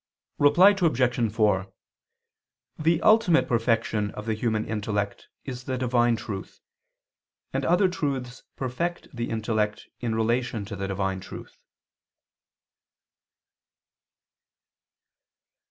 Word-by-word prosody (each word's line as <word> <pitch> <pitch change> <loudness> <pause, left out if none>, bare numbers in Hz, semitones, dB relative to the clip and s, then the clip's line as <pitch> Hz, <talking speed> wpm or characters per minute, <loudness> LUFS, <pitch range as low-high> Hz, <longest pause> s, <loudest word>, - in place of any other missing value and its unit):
Reply 145 +7 +7
Obj. 125 - +1
4: 100 -4 +1 1.1
The 165 +2 +2
ultimate 215 -6 +5
perfection 115 -3 +1
of 105 - -7
the 110 - 0
human 110 0 -1
intellect 105 -1 -3 0.2
is 125 -2 -6
the 130 - -2
divine 120 -1 +2
truth: 105 -3 -7 0.9
and - - -1
other 180 +3 +4
truths 135 -8 -3
perfect 140 +5 -4
the 120 0 -3
intellect 110 -1 -2
in 115 -2 -2
relation 115 -1 0
to 105 0 -6
the 95 0 -4
divine 95 -1 -2
truth. 95 - -11
120 Hz, 100 wpm, -26 LUFS, 105-135 Hz, 1.1 s, Reply